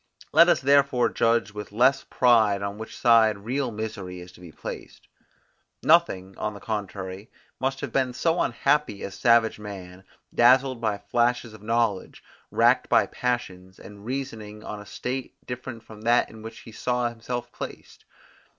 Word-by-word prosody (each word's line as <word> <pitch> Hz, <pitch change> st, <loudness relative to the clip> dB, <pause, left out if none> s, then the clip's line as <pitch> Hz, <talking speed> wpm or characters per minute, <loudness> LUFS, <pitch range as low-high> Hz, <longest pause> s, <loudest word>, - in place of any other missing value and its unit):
Let 165 Hz, +3 st, +7 dB
us -, -, +3 dB
therefore 135 Hz, -3 st, +3 dB
judge 115 Hz, -2 st, +1 dB
with 105 Hz, -1 st, -7 dB
less 130 Hz, +5 st, +3 dB
pride 110 Hz, -5 st, +3 dB
on 100 Hz, +1 st, -4 dB
which 110 Hz, -, -8 dB
side 115 Hz, -3 st, +5 dB
real 125 Hz, +6 st, -2 dB
misery 105 Hz, -5 st, -6 dB
is 90 Hz, 0 st, -11 dB
to 90 Hz, -, -18 dB
be 90 Hz, -2 st, -12 dB
placed. -, -, -9 dB, 0.8 s
Nothing, 95 Hz, -, +3 dB
on 105 Hz, -1 st, -3 dB
the -, -, -9 dB
contrary, 100 Hz, -2 st, -5 dB, 0.3 s
must 135 Hz, 0 st, -1 dB
have -, -, -4 dB
been 130 Hz, -2 st, +1 dB
so 165 Hz, +5 st, +1 dB
unhappy 140 Hz, -3 st, 0 dB
as 100 Hz, -, -5 dB
savage 115 Hz, 0 st, +3 dB
man, 95 Hz, -3 st, -9 dB, 0.3 s
dazzled 130 Hz, +1 st, +4 dB
by 105 Hz, -3 st, 0 dB
flashes 120 Hz, +1 st, 0 dB
of 110 Hz, -, -13 dB
knowledge, 115 Hz, -3 st, -1 dB, 0.3 s
racked -, -, +3 dB
by -, -, +5 dB
passions, 95 Hz, -7 st, -4 dB
and 100 Hz, 0 st, -13 dB
reasoning 110 Hz, -4 st, -5 dB
on 105 Hz, -, -6 dB
a 105 Hz, -, -13 dB
state 130 Hz, +4 st, -5 dB
different 125 Hz, -2 st, -7 dB
from 110 Hz, -1 st, -13 dB
that 120 Hz, +2 st, +2 dB
in 110 Hz, -, -12 dB
which 115 Hz, +1 st, -9 dB
he 115 Hz, -, -12 dB
saw 125 Hz, +2 st, -1 dB
himself 120 Hz, +1 st, -5 dB
placed. -, -, -9 dB
115 Hz, 160 wpm, -25 LUFS, 105-125 Hz, 0.8 s, Let